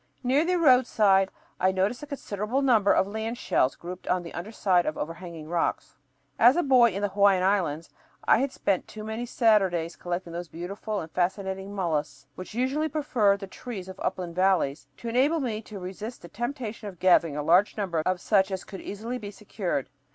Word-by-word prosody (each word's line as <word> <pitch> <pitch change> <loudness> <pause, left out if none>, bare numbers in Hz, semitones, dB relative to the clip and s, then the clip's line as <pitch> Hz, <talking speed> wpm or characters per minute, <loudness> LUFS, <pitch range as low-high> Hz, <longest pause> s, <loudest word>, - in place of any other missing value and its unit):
Near 265 +5 +3
the 360 +2 +1
roadside 225 - +4 0.3
I 185 +1 +3
noticed 195 +6 0
a 295 - -8
considerable 250 -2 -2
number 225 -7 +4
of - - +4
land 220 +3 -4
shells 130 - +1
grouped 180 +1 -9
on 180 -1 +1
the 170 - -9
under 185 +6 -6
side 185 -5 +2
of 155 - -2
overhanging 165 -1 -6
rocks. 170 -5 -2 0.4
As 245 +4 +7
a 350 - +2
boy 255 -4 +6
in 200 0 -4
the 205 - +1
Hawaiian 195 -1 +4
Islands 170 -5 0 0.3
I - - +4
had 270 +1 0
spent 195 -7 -1
too 215 - -9
many 220 +3 -4
Saturdays 190 -9 +2
collecting 175 -1 -4
those 175 +1 -5
beautiful 200 +6 -5
and 160 -1 -9
fascinating 190 +2 -2
mollusks, 150 -7 -2
which 185 +7 -9
usually 275 +6 0
prefer 255 -10 +2
the 200 - -7
trees 195 -1 -8
of 190 0 -10
upland 175 -2 -3
valleys, 180 -5 +1
to 235 - -8
enable 270 +8 +2
me 225 -6 -2
to 215 -1 -10
resist 195 +5 -7
the - - -8
temptation 235 - -5
of 185 - -13
gathering 170 -4 +3
a 150 - -2
large 180 +8 +4
number 180 -6 -1
of 185 +1 0
such 190 0 +2
as 190 -1 -4
could 195 - -9
easily 230 +5 -5
be 205 -3 -7
secured. 195 - -3
200 Hz, 195 wpm, -27 LUFS, 180-230 Hz, 0.4 s, As